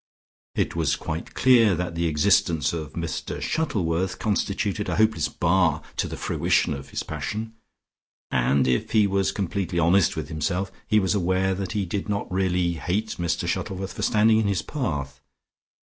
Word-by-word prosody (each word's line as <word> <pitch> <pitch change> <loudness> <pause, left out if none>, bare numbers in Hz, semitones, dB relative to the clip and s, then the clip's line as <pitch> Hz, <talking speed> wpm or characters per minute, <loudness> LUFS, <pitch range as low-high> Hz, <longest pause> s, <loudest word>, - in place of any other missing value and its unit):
It - - 0
was 80 -5 +1
quite 80 +1 -5
clear 115 -7 +5
that 90 0 -3
the 85 0 0
existence 75 0 +2
of 80 -4 -5
Mr - - -4
Shuttleworth 95 - -1
constituted 105 -1 -1
a - - 0
hopeless 110 +1 +2
bar 85 -3 +2
to - - 0
the - - -6
fruition - - +1
of 70 -1 -8
his - - -3
passion, 110 +1 -4 0.8
and, 65 +1 +2
if 65 -2 0
he 105 -2 +5
was 100 -1 +1
completely 95 -2 -2
honest 85 +3 +3
with 80 -2 -4
himself, 90 +5 -2 0.2
he 110 - +4
was 95 -1 +1
aware 95 0 +1
that 95 +1 -4
he 105 -3 -1
did 100 +3 -4
not 100 -2 -2
really 90 -2 +1
hate 100 +6 -2
Mr 85 -1 -1
Shuttleworth 95 0 -3
for - - -6
standing 110 +1 +4
in 110 - +1
his 95 -3 0
path. 70 - -4
95 Hz, 165 wpm, -25 LUFS, 80-100 Hz, 0.8 s, clear